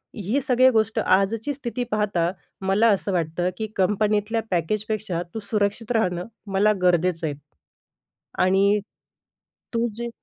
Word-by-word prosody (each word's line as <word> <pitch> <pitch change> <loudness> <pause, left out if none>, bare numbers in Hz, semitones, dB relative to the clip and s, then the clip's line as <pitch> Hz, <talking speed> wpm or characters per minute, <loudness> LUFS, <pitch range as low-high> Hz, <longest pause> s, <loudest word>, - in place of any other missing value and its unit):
ही 215 +7 -1
सगळी 255 -1 +4
गोष्ट 220 0 +1
आजची 205 +8 +1
स्थिती 250 -3 -4
पाहता 200 -5 +1 0.3
मला 195 +4 +3
असं 200 -1 +1
वाटतं, 175 +1 0
की 220 - -3
कंपनीतल्या 210 +3 +1
पॅकेजपेक्षा 200 +1 -1
तू - - -2
सुरक्षित 210 +2 0
राहणं 180 -5 0 0.3
मला 210 +2 +4
गरजेचं 175 -2 +2
आहे." 145 - -3 1.1
आणि 200 +2 +3 1.0
तू 230 +1 +2
जे 235 0 -3
205 Hz, 125 wpm, -24 LUFS, 185-220 Hz, 1.1 s, सगळी